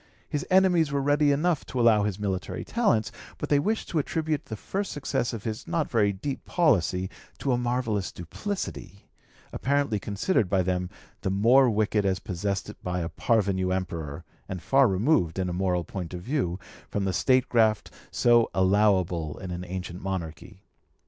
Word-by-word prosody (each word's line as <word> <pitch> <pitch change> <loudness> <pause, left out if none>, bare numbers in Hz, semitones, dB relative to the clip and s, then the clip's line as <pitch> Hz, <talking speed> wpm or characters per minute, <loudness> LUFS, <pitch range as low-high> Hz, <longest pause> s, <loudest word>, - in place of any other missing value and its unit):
His 145 - -2
enemies 180 -5 +4
were 140 - +1
ready 145 +1 +3
enough 155 +3 +1
to 130 - -4
allow 115 -3 +5
his 100 -2 -1
military 95 -3 -3
talents, 115 - +1 0.3
but - - -5
they 145 - +4
wished 215 +9 -1
to 165 - 0
attribute 155 0 -2
the 110 - -6
first 195 - -3
success 140 -4 -1
of 115 -4 -6
his 110 -1 -5
not 165 -3 -1
very 105 -4 +3
deep 130 +8 -5
policy 95 - +2 0.3
to 135 - -1
a 125 - +2
marvellous 120 -5 -1
duplicity, 100 - -6 0.4
apparently 140 -6 0
considered 100 - 0
by 95 -1 +2
them 90 0 -1 0.3
the - - -1
more 120 +7 +5
wicked 105 -1 +1
as 95 -1 +1
possessed 95 +1 -3
by 90 -1 -2
a 85 - -3
parvenu 95 -5 +1
emperor, 85 -6 -3 0.3
and 95 -2 -5
far 135 -1 +5
removed, 95 - +2
in 95 -1 -1
a - - -3
moral 90 -1 0
point 90 +1 -6
of 90 - -7
view, 120 - -1 0.3
from 100 -1 -1
the 95 - 0
statecraft 115 +1 +2 0.2
so 120 -1 +4
allowable 95 -5 +2
in 95 -2 -7
an 90 0 -4
ancient 90 -1 -6
monarchy. 85 -6 -6
105 Hz, 170 wpm, -27 LUFS, 95-135 Hz, 0.4 s, allow